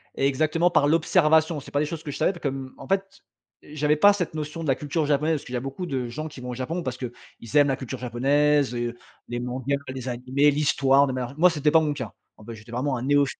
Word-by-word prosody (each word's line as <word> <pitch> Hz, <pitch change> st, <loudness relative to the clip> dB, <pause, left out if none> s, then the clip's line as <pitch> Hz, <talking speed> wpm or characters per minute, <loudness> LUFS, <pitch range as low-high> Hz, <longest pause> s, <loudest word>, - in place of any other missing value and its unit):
Exactement. 155 Hz, +5 st, +2 dB
Par 145 Hz, -, +3 dB
l'observation. 160 Hz, 0 st, +3 dB
C'est 140 Hz, -, -12 dB
pas 145 Hz, -, +1 dB
des 150 Hz, -, +1 dB
choses 160 Hz, +1 st, -6 dB
que 145 Hz, -, -5 dB
je -, -, -6 dB
savais, -, -, +2 dB
pas 175 Hz, -, -11 dB
comme 135 Hz, -3 st, -4 dB
en 135 Hz, -, -11 dB
fait, 195 Hz, 0 st, -2 dB, 0.4 s
j'avais 150 Hz, 0 st, 0 dB
pas 205 Hz, +7 st, +6 dB
cette 180 Hz, -6 st, -3 dB
notion 155 Hz, +1 st, -5 dB
de 155 Hz, -, -4 dB
la 135 Hz, -, +3 dB
culture 150 Hz, +3 st, -2 dB
japonaise. 150 Hz, +2 st, +2 dB
Parce -, -, -11 dB
qu'il 125 Hz, -, -9 dB
y -, -, 0 dB
a -, -, -1 dB
beaucoup 135 Hz, +7 st, -5 dB
de 130 Hz, -6 st, -2 dB
gens 155 Hz, +6 st, -5 dB
qui 145 Hz, -4 st, -10 dB
vont 125 Hz, -, -6 dB
au 125 Hz, -, -3 dB
Japon, 130 Hz, +8 st, -3 dB
parce 130 Hz, -3 st, -4 dB
qu'ils 125 Hz, -2 st, -5 dB, 0.4 s
aiment 145 Hz, -1 st, +6 dB
la 135 Hz, -, +1 dB
culture 130 Hz, -1 st, -7 dB
japonaise, 140 Hz, +3 st, +2 dB
heu, 120 Hz, 0 st, -2 dB, 0.3 s
les 120 Hz, 0 st, -4 dB
mangas, 130 Hz, +3 st, -2 dB
les 130 Hz, -1 st, -6 dB
animés, 130 Hz, +4 st, +2 dB
l'histoire 140 Hz, -1 st, +3 dB
de 130 Hz, -, -2 dB
manière 125 Hz, -1 st, -3 dB
g 140 Hz, -, -12 dB
moi, 180 Hz, +3 st, +6 dB
c'était 150 Hz, -3 st, +1 dB
pas 160 Hz, 0 st, +6 dB
mon 150 Hz, -2 st, 0 dB
cas. 130 Hz, -7 st, -6 dB, 0.2 s
Ah -, -, -15 dB
ben, 115 Hz, -, -7 dB
j'étais 110 Hz, +1 st, -13 dB
vraiment 130 Hz, +2 st, -1 dB
un 120 Hz, -, -5 dB
néophyte. 145 Hz, 0 st, +2 dB
140 Hz, 265 wpm, -25 LUFS, 130-155 Hz, 0.4 s, pas